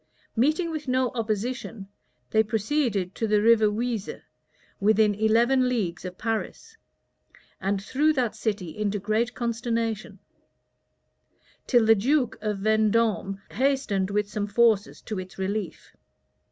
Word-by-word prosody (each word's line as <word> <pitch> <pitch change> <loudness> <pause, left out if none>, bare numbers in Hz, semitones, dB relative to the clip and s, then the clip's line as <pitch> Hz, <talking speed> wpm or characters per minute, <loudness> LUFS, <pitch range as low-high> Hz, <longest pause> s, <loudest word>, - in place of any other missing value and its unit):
Meeting 310 +8 +1
with 305 -3 -5
no 255 -1 +1
opposition, 225 -2 -3 0.4
they 220 - +5
proceeded 215 -3 -1
to 225 - -2
the 210 0 +3
River 220 0 +5
Oise, 220 0 -2 0.7
within 215 +1 +3
eleven 235 +5 +3
leagues 200 -9 -2
of 180 0 -7
Paris, 225 - -4 0.8
and 195 +1 -1
threw 290 +8 +2
that 250 -6 -1
city 200 -7 -3
into 210 -1 -1
great 215 +4 -1
consternation; 230 -2 -2 1.5
till 240 -3 +4
the 225 - +7
duke 250 +4 +1
of 210 -2 -2
Vendôme 215 -2 +1
hastened 250 -7 0
with 210 0 0
some 205 0 -3
forces 220 -1 +2
to 215 -3 -4
its 185 0 -9
relief. 195 -1 -4
220 Hz, 125 wpm, -26 LUFS, 205-240 Hz, 1.5 s, the